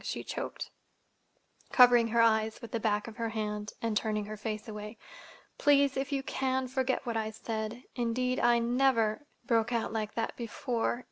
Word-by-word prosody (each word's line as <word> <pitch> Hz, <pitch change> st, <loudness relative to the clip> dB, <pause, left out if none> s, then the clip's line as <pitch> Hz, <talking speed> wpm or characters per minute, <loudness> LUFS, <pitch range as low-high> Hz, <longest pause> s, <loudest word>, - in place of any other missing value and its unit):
she -, -, -4 dB
choked, -, -, -5 dB, 1.0 s
covering 245 Hz, -2 st, +7 dB
her 230 Hz, +1 st, +3 dB
eyes 220 Hz, -1 st, +2 dB
with 230 Hz, -, -10 dB
the 230 Hz, -, -1 dB
back 210 Hz, -1 st, 0 dB
of 230 Hz, 0 st, -9 dB
her 230 Hz, -1 st, -1 dB
hand, 210 Hz, -1 st, -3 dB
and 225 Hz, -2 st, 0 dB
turning 210 Hz, 0 st, 0 dB
her 215 Hz, +1 st, -6 dB
face 215 Hz, +1 st, -5 dB
away. 210 Hz, +1 st, -7 dB, 0.6 s
"Please, 280 Hz, -1 st, +4 dB
if 270 Hz, +1 st, -2 dB
you 275 Hz, -1 st, -1 dB
can, 260 Hz, -1 st, -1 dB
forget 260 Hz, 0 st, -1 dB
what 235 Hz, -2 st, -2 dB
I 220 Hz, -1 st, -1 dB
said. 220 Hz, +2 st, -5 dB
Indeed, 250 Hz, +1 st, 0 dB
I 240 Hz, 0 st, +4 dB
never—broke 235 Hz, -1 st, +1 dB
out 230 Hz, -2 st, -1 dB
like 215 Hz, -1 st, -3 dB
that—before. 235 Hz, +1 st, -2 dB
230 Hz, 160 wpm, -30 LUFS, 220-250 Hz, 1.0 s, covering